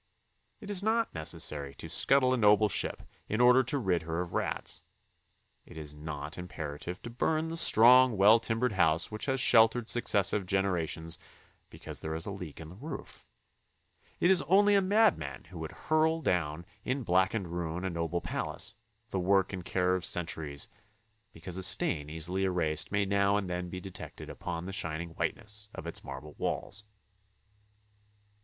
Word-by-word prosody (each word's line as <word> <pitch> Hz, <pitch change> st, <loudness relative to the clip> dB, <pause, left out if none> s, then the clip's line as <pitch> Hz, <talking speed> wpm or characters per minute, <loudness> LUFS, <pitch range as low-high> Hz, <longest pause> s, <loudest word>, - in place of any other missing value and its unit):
It 205 Hz, -1 st, -7 dB
is 195 Hz, -2 st, +2 dB
not 225 Hz, +2 st, +1 dB
necessary 75 Hz, -3 st, -2 dB
to -, -, -8 dB
scuttle 130 Hz, -, +4 dB
a -, -, +1 dB
noble 105 Hz, -1 st, +5 dB
ship -, -, 0 dB, 0.3 s
in 110 Hz, -, -1 dB
order 125 Hz, +1 st, +6 dB
to 135 Hz, +4 st, -1 dB
rid 95 Hz, -, 0 dB
her 80 Hz, +1 st, -3 dB
of 90 Hz, -1 st, -4 dB
rats; -, -, -2 dB, 0.8 s
it -, -, -14 dB
is 75 Hz, -2 st, -7 dB
not 75 Hz, +1 st, -7 dB
imperative 85 Hz, 0 st, -6 dB
to 120 Hz, -, -7 dB
burn 155 Hz, +6 st, 0 dB
the 165 Hz, -, -4 dB
strong, 125 Hz, -4 st, +6 dB
well 105 Hz, +4 st, +7 dB
timbered 115 Hz, +2 st, 0 dB
house 80 Hz, -2 st, +2 dB
which 110 Hz, +4 st, -4 dB
has 135 Hz, 0 st, +1 dB
sheltered 115 Hz, -1 st, +5 dB
successive 100 Hz, -4 st, +1 dB
genera 95 Hz, -4 st, +1 dB
tions 80 Hz, +3 st, -4 dB, 0.5 s
because -, -, -7 dB
there 80 Hz, 0 st, -4 dB
is 80 Hz, -, -2 dB
a 100 Hz, -, -4 dB
leak 90 Hz, -7 st, -8 dB
in 80 Hz, -1 st, -9 dB
the 90 Hz, -, -11 dB
roof; 150 Hz, +8 st, -9 dB, 0.9 s
it 175 Hz, -, +4 dB
is 185 Hz, -, +4 dB
only 205 Hz, +3 st, +5 dB
a 200 Hz, -, +5 dB
madman 190 Hz, -, +2 dB
who -, -, -11 dB
would -, -, -5 dB
hurl 160 Hz, +1 st, +1 dB
down 85 Hz, -1 st, -1 dB, 0.2 s
in 130 Hz, +1 st, -2 dB
blackened 95 Hz, 0 st, +1 dB
ruin 85 Hz, +1 st, -4 dB
a -, -, 0 dB
noble 85 Hz, +1 st, -2 dB
palace, -, -, -4 dB, 0.4 s
the 95 Hz, -, -2 dB
work 95 Hz, +1 st, +2 dB
and 90 Hz, -2 st, -5 dB
care 90 Hz, 0 st, +1 dB
of 95 Hz, -1 st, -1 dB
centuries, 80 Hz, -5 st, -3 dB, 0.6 s
because 85 Hz, +2 st, -7 dB
a -, -, -2 dB
stain 75 Hz, -4 st, +2 dB
easily 85 Hz, +5 st, -2 dB
erased 85 Hz, -4 st, 0 dB
may 100 Hz, 0 st, +1 dB
now 100 Hz, +1 st, +2 dB
and 100 Hz, -2 st, -2 dB
then 90 Hz, 0 st, -4 dB
be 90 Hz, -, -6 dB
detected 95 Hz, 0 st, -9 dB
upon 85 Hz, -1 st, -5 dB
the 95 Hz, -, -6 dB
shining 80 Hz, -2 st, -3 dB
whiteness 105 Hz, +5 st, -3 dB
of -, -, -8 dB
its -, -, -3 dB
marble 75 Hz, 0 st, -8 dB
walls. 105 Hz, +1 st, -3 dB
95 Hz, 170 wpm, -30 LUFS, 80-115 Hz, 0.9 s, well